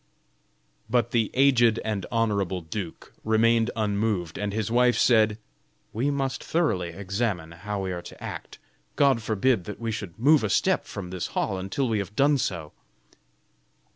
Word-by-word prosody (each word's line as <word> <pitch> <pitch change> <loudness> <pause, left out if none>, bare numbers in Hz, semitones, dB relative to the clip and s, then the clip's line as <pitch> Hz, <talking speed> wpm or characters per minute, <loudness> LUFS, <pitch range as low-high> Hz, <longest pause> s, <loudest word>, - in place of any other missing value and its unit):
But 120 -3 +1
the 115 -3 +1
aged 120 -4 +4
and 105 -4 -2
honorable 100 -5 0
duke 85 +1 -7
remained 115 +1 +3
unmoved, 105 -5 -1
and 105 0 -2
his 110 +1 -2
wife, 125 0 +4
said: 110 -3 +4 0.6
"We 125 +6 0
must 135 -2 -2
thoroughly 150 - 0
examine 95 -1 -3
how 100 +4 -5
we 95 - -2
are 90 -1 -4
to 85 - -12
act. - - -7 0.4
God 135 -5 +3
forbid 110 -1 +1
that 105 - -7
we 115 -1 -2
should 100 -6 -6
move 145 +3 +4
a 105 - 0
step - - +2
from 90 -3 -7
this 90 -2 -3
hall 95 - 0
until 95 +8 -1
we 110 -2 0
have 100 +1 -5
done 140 +2 +3
so." 80 -9 -3
110 Hz, 160 wpm, -26 LUFS, 95-120 Hz, 0.6 s, aged